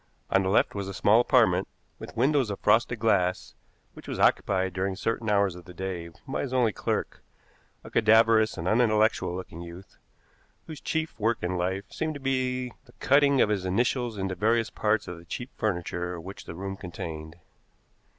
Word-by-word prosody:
On 95 - +4
the 95 - -1
left 100 - +3
was 100 -1 -4
a 95 - -6
small 105 +3 +4
apartment, 110 -8 +3 0.3
with - - -10
windows 135 -1 +2
of 100 - -4
frosted 115 +3 +3
glass, 100 -5 +1 0.4
which - - -13
was - - -4
occupied 95 -1 +2
during 95 +1 -1
certain 115 +2 -2
hours 100 -3 +3
of 90 0 -12
the 90 -1 -12
day 90 -2 -4 0.2
by 135 - -2
his 130 -2 -4
only 120 -5 +3
clerk, - - -3 0.6
a - - -11
cadaverous 110 0 +4
and 85 - -4
unintellectual 110 -4 +2
looking 90 -2 -7
youth, 85 +2 -11 0.7
whose 155 -3 -9
chief 160 -5 -3
work 110 0 0
in 90 +1 -1
life 95 +2 -2
seemed 155 -1 -3
to - - -6
be 130 -2 -1
the 120 - -20
cutting 140 0 +3
of - - +3
his 100 -3 0
initials 120 +4 0
into 95 -1 -2
various 115 +4 +1
parts 110 -1 0
of 90 -1 -7
the 85 - -16
cheap 120 +9 -6
furniture 90 -3 -2
which 95 +4 -9
the - - -8
room 95 +2 -5
contained. 80 -3 -7
105 Hz, 180 wpm, -27 LUFS, 90-120 Hz, 0.7 s, On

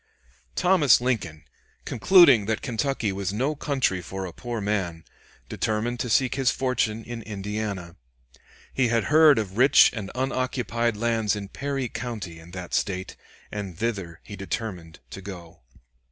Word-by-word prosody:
Thomas 180 - +5
Lincoln, 105 -12 -2 0.4
concluding 135 - +6
that 110 -1 -1
Kentucky 120 -3 -1
was 95 0 -3
no 130 +9 0
country 135 -11 0
for 95 +2 -6
a 90 - -7
poor 120 -2 -5
man, 95 -6 -2 0.4
determined 115 +3 -2
to 125 - -2
seek 130 +3 +3
his 135 -2 +2
fortune 115 -4 0
in 120 0 -7
Indiana. 105 -4 -5 0.8
He 130 -2 +2
had 115 -1 +1
heard 155 -3 +7
of 105 -2 -3
rich 135 +3 +7
and 105 -5 -5
unoccupied 125 -3 -1
lands 115 -2 +1
in 100 -1 -6
Perry 140 0 -3
County 105 -10 -6
in 80 +1 -14
that 90 -1 -8
State, 95 -2 -1 0.4
and 100 -5 -6
thither 95 -7 -3
he 100 - -9
determined 95 -4 -5
to 95 - -8
go. 90 -4 -10
110 Hz, 145 wpm, -25 LUFS, 95-125 Hz, 0.8 s, heard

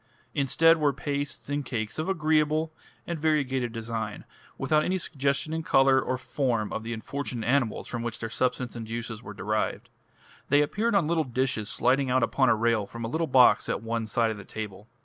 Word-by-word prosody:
Instead 165 +4 +4
were 145 -2 +2
pastes 140 +1 -3
and 145 +1 -1
cakes 115 -1 -4
of 160 +4 -2
agreeable 155 -2 +1 0.3
and 170 -2 -4
variegated 135 -6 +1
design, 115 0 -4 0.3
without 155 0 +2
any 185 +3 0
suggestion 140 -2 -1
in 160 - -1
colour 135 -3 +4
or 130 - -2
form 120 -5 -1
of - - -2
the 115 +1 -6
unfortunate 120 0 -4
animals 125 -3 +1
from 120 - -4
which 120 -1 -3
their 115 - -4
substance 125 +1 -1
and 115 -2 -6
juices 115 -1 -5
were 105 -4 -9
derived. 105 +2 -2 0.6
They 145 +1 +5
appeared 215 +9 0
on 195 -5 +4
little 165 -1 +2
dishes 125 -4 -1
sliding 135 0 +2
out 130 -1 +3
upon 130 +3 +2
a - - +5
rail 110 -2 +1
from 115 +1 -6
a - - -3
little 160 +5 -1
box 125 -5 +5
at - - -2
one 115 -1 -2
side 115 0 +1
of 110 - -5
the 100 - -9
table. 105 0 -7
130 Hz, 195 wpm, -27 LUFS, 115-150 Hz, 0.6 s, They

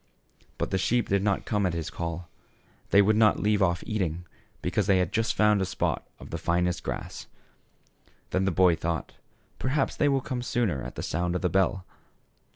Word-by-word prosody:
But - - -2
the 95 - +1
sheep 120 +4 +1
did 100 0 +2
not 100 -1 0
come 105 -1 0
at 85 - -2
his 80 -2 -4
call; 85 0 -4 0.6
they 100 - +6
would 105 +2 +3
not 110 -1 +4
leave 105 0 +2
off 85 -2 +2
eating, 90 -5 -2 0.4
because 105 -3 0
they 95 -2 +5
had 90 -2 0
just 115 0 0
found 105 -2 +4
a - - +2
spot - - -1 0.2
of - - -11
the - - -3
finest 90 +1 0
grass. - - -6 1.0
Then 95 +1 +1
the 95 - +2
boy 90 0 +4
thought, 80 0 -3 0.5
"Perhaps 135 +1 0
they 145 - +3
will 135 -1 +2
come 125 -1 -4
sooner 115 - 0
at - - -7
the - - -5
sound 90 +2 -1
of 90 - -2
the 90 - +2
bell." 95 +1 +1
95 Hz, 195 wpm, -27 LUFS, 85-105 Hz, 1.0 s, they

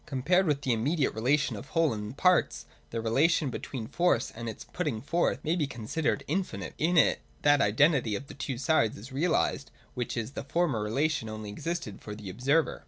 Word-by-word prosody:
(i) - - -34
Compared 165 +8 +2
with 145 -2 +1
the 130 - +2
immediate 135 +6 +1
relation 135 +3 +1
of 105 +7 -8
whole 165 -5 +2
and 105 +4 -6
parts, 180 -1 +3 0.2
the 115 - -3
relation 135 +6 +2
between 120 -2 -5
force 170 -5 +1
and 115 0 -6
its 110 - -8
putting 150 -11 -3
forth 170 +8 0
may 160 +2 +1
be 155 -5 0
considered 135 +5 -2
infinite. 180 +5 -3
In 170 +3 +2
it 155 - +5 0.2
that 145 -1 +5
identity 120 +1 +3
of 130 - -5
the - - -11
two 135 -2 -4
sides 130 -5 +2
is 115 +7 -10
realised, 145 -1 0 0.2
which 125 -2 -3
in 115 -2 -1
the - - -5
former 140 -5 0
relation 125 +2 0
only 110 -1 -6
existed 165 - -4
for 105 - -7
the 105 -3 -7
observer. 140 - +1
140 Hz, 195 wpm, -29 LUFS, 115-160 Hz, 0.2 s, it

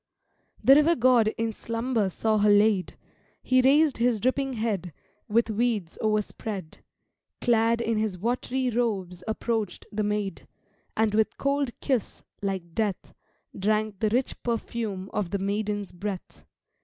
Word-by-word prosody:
The 265 +5 +8
River 300 +4 +5
God 245 -2 +4
in 225 0 -1
slumber 230 -2 -1
saw 215 +3 0
her 210 +1 +4
laid: 205 -2 +3 0.5
He 255 0 +4
raised 285 +2 +4
his 235 -1 +2
dripping 265 +3 0
head, 205 -7 -2 0.3
With 225 +1 +2
weeds 215 -6 -1
o'erspread, 210 -4 -2 0.6
Clad 230 -1 +2
in 225 -2 0
his 215 -4 -1
wat'ry 250 +4 -1
robes 195 -7 -1
approach'd 220 -2 -2
the 215 - -2
maid, 210 -1 -2 0.5
And 220 -1 +2
with 220 0 +1
cold 280 -1 0
kiss, 255 -6 -1 0.2
like 190 -4 -3
death, 210 -2 -2 0.4
Drank 215 0 0
the 215 - +2
rich 245 +4 -1
perfume 220 -4 -3
of 200 -4 -1
the 200 - -1
maiden's 205 0 -2
breath. 190 +1 -6
220 Hz, 135 wpm, -27 LUFS, 205-240 Hz, 0.6 s, The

